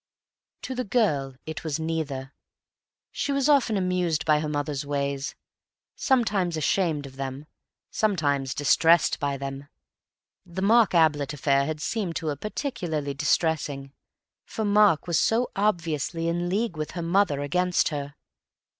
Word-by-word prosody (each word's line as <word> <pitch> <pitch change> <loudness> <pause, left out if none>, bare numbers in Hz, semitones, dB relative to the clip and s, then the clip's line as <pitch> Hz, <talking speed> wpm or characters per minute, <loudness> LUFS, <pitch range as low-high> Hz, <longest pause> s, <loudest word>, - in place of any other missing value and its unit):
To 260 - -4
the 255 0 -2
girl 150 - 0
it 160 0 -6
was 155 -2 -2
neither. 150 -4 -3 0.8
She 285 - -2
was 275 0 +1
often 270 -8 +3
amused 180 -5 0
by 155 -1 +4
her 155 0 -3
mother's 145 -1 -2
ways; 140 0 -2 0.6
sometimes 205 - +1
ashamed 155 -2 0
of 135 -1 -12
them; 135 +1 -5 0.5
sometimes 145 -10 0
distressed 165 +3 +4
by 140 -1 -1
them. 135 +1 -6 0.8
The 180 +2 -5
Mark 225 -1 +4
Ablett 150 -4 +3
affair 140 -1 +1
had 155 -1 -3
seemed 185 0 -2
to 160 - -2
her 145 - -1
particularly 160 - -3
distressing, 145 -1 0 0.5
for 220 - -4
Mark 205 -5 +4
was 170 -3 +1
so 235 +3 +1
obviously 165 -5 -1
in 175 +1 -1
league 200 -2 -1
with 155 0 -4
her 170 - -2
mother 170 -4 +2
against 180 +5 +1
her. 145 -2 -5
160 Hz, 140 wpm, -26 LUFS, 145-190 Hz, 0.8 s, by